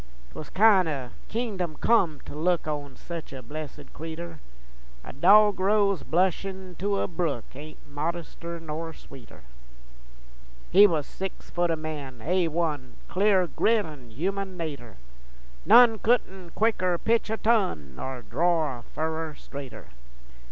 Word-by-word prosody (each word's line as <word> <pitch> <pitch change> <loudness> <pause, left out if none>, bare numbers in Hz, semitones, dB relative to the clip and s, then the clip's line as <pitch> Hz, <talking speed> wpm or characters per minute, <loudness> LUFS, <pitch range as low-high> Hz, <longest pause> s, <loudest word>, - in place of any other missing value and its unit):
'Twas 155 - -8
kin' 195 -3 +5
o' 135 -6 -4 0.2
kingdom 200 -8 -3
come 175 -11 +3
to - - -10
look 170 +2 0
On 145 -3 -4
sech 170 -2 -8
a 130 -1 -8
blessed 145 +2 -8
cretur, 165 0 -7 0.6
A - - -9
dogrose 200 +4 +4
blushin' 185 +1 -1
to 200 +1 0
a - - 0
brook 165 -8 -2
Ain't 150 +3 -10
modester 170 +3 -4
nor 160 +1 -5
sweeter. 130 - -14 1.3
He 200 +3 +9
was 155 -6 -1
six 190 -1 -7
foot 175 0 +1
o' 165 - +2
man, 150 -5 -6
A 180 +1 +2
1, 155 -5 -2
Clear 195 -1 +3
grit 215 +4 +2
an' 140 -6 -11
human 190 - -3
natur', 140 -9 -6 0.7
None 235 -3 +8
couldn't 190 -7 0
quicker 185 -5 +2
pitch 230 +4 +1
a 220 - -1
ton 190 - +1
Nor 130 - -6
dror 160 -7 +1
a - - -12
furrer 160 +3 -4
straighter. 140 - -9
170 Hz, 135 wpm, -27 LUFS, 150-190 Hz, 1.3 s, He